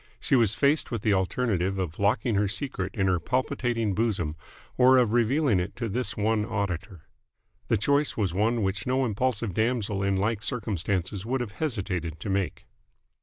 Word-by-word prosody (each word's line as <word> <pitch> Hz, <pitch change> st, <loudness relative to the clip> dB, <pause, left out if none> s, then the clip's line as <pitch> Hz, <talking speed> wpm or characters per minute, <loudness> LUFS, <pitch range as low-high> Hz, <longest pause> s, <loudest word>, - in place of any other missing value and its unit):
She -, -, +1 dB
was 115 Hz, -6 st, +3 dB
faced 145 Hz, +2 st, +2 dB
with 115 Hz, -4 st, -4 dB
the 105 Hz, -, +3 dB
alternative 95 Hz, -1 st, 0 dB
of 90 Hz, -4 st, -4 dB
locking 105 Hz, +3 st, +2 dB
her 100 Hz, 0 st, +2 dB
secret 100 Hz, -2 st, -4 dB
in 95 Hz, -, +1 dB
her 90 Hz, -2 st, +2 dB
palpitating 120 Hz, -, -1 dB
bosom 95 Hz, -8 st, -1 dB, 0.4 s
or 130 Hz, +1 st, +6 dB
of 120 Hz, -3 st, +3 dB
revealing 120 Hz, -, +3 dB
it 90 Hz, +3 st, -4 dB
to 120 Hz, -1 st, -3 dB
this 110 Hz, -1 st, -3 dB
one 105 Hz, 0 st, +1 dB
auditor. 100 Hz, -4 st, -3 dB, 0.6 s
The -, -, +2 dB
choice 140 Hz, +7 st, +1 dB
was 100 Hz, -5 st, 0 dB
one 110 Hz, +4 st, +1 dB
which 95 Hz, +3 st, -2 dB
no 130 Hz, +1 st, +2 dB
impulsive 115 Hz, -2 st, -1 dB
damsel 110 Hz, -2 st, 0 dB
in 100 Hz, 0 st, +1 dB
like 105 Hz, +2 st, 0 dB
circumstances 100 Hz, -4 st, -2 dB
would 130 Hz, +4 st, -1 dB
have 115 Hz, -4 st, -4 dB
hesitated 95 Hz, -, -3 dB
to 100 Hz, -, -3 dB
make. 95 Hz, -2 st, -2 dB
105 Hz, 170 wpm, -27 LUFS, 95-120 Hz, 0.6 s, or